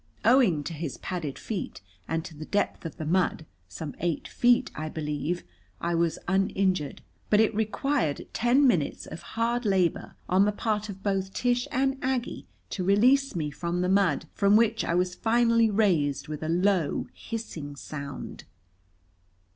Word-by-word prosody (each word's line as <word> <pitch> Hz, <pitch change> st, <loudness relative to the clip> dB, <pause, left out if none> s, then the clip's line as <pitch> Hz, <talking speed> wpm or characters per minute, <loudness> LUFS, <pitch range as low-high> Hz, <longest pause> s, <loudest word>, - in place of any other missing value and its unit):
Owing 225 Hz, -, +5 dB
to 165 Hz, -, -5 dB
his 155 Hz, -3 st, -5 dB
padded 165 Hz, -7 st, -4 dB
feet 215 Hz, -4 st, -5 dB, 0.3 s
and 160 Hz, 0 st, -2 dB
to 160 Hz, -, -9 dB
the 155 Hz, +1 st, -7 dB
depth 205 Hz, -4 st, -1 dB
of 160 Hz, -, -11 dB
the 155 Hz, -, -4 dB
mud 170 Hz, -1 st, +1 dB, 0.2 s
some 140 Hz, -, -6 dB
eight 170 Hz, -2 st, -1 dB
feet, 245 Hz, +1 st, +3 dB
I 155 Hz, 0 st, -4 dB
believe 155 Hz, +2 st, -3 dB, 0.4 s
I 170 Hz, 0 st, -1 dB
was 165 Hz, -1 st, +1 dB
uninjured. 190 Hz, -4 st, 0 dB, 0.3 s
But 210 Hz, -, +5 dB
it 220 Hz, 0 st, +4 dB
required 220 Hz, -, 0 dB
ten 250 Hz, +4 st, +3 dB
minutes 180 Hz, -, +1 dB
of 160 Hz, -, -8 dB
hard 235 Hz, +5 st, -1 dB
labor 190 Hz, -5 st, +1 dB
on 190 Hz, +2 st, +4 dB
the 210 Hz, -, +2 dB
part 210 Hz, 0 st, -2 dB
of 195 Hz, -1 st, -8 dB
both 195 Hz, -1 st, -1 dB
Tish 245 Hz, 0 st, +1 dB
and 270 Hz, +1 st, 0 dB
Aggie 260 Hz, -1 st, -2 dB, 0.2 s
to 185 Hz, -, -2 dB
release 250 Hz, +8 st, +4 dB
me 150 Hz, -3 st, -2 dB
from 170 Hz, +4 st, -2 dB
the 180 Hz, -, +1 dB
mud, 185 Hz, -5 st, +2 dB
from 200 Hz, 0 st, +4 dB
which 225 Hz, 0 st, +3 dB
I 170 Hz, -, 0 dB
was 180 Hz, 0 st, +1 dB
finally 230 Hz, +1 st, +3 dB
raised 175 Hz, -10 st, +1 dB
with 150 Hz, -1 st, -5 dB
a 160 Hz, -, -3 dB
low, 180 Hz, -2 st, +1 dB
hissing 165 Hz, -11 st, -6 dB
sound. 140 Hz, 0 st, -7 dB
190 Hz, 165 wpm, -27 LUFS, 160-225 Hz, 0.4 s, Owing